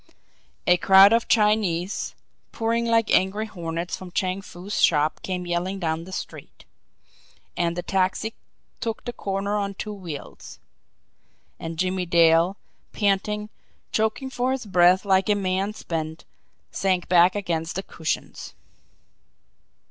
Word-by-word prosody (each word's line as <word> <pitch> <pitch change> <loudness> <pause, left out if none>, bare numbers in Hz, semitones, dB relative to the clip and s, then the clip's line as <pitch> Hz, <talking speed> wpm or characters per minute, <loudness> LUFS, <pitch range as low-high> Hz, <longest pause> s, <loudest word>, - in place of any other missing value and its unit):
A 180 0 +5
crowd 195 +3 +7
of 230 0 +2
Chinese, 210 -4 +1 0.4
pouring 230 +1 0
like 230 -1 +2
angry 195 +4 +2
hornets 170 -3 -4
from 185 - -10
Chang 185 +1 -1
Foo's 195 +1 -5
shop, 150 -1 +3
came 180 -1 -4
yelling 175 +3 -2
down 165 -2 -2
the 190 - -11
street - - -8 0.9
and 170 -1 0
the 175 - -3
taxi 195 +3 0 0.5
took 225 -2 -4
the 240 - -4
corner 200 -1 -2
on 200 -1 -2
two 210 +2 -5
wheels 175 -8 -9 1.0
and 165 0 -6
Jimmie 185 +1 -1
Dale, 170 +2 +4 0.4
panting, 210 +1 0 0.4
choking 220 +5 -1
for 255 +1 0
his 265 -3 -4
breath 185 0 +4
like 195 +1 +2
a 210 - +4
man 195 0 -1
spent, 160 -3 -5 0.5
sank 185 -2 0
back 180 +1 +5
against 170 -4 -2
the 190 - -3
cushions. 160 -4 -5
190 Hz, 130 wpm, -24 LUFS, 175-210 Hz, 1.0 s, crowd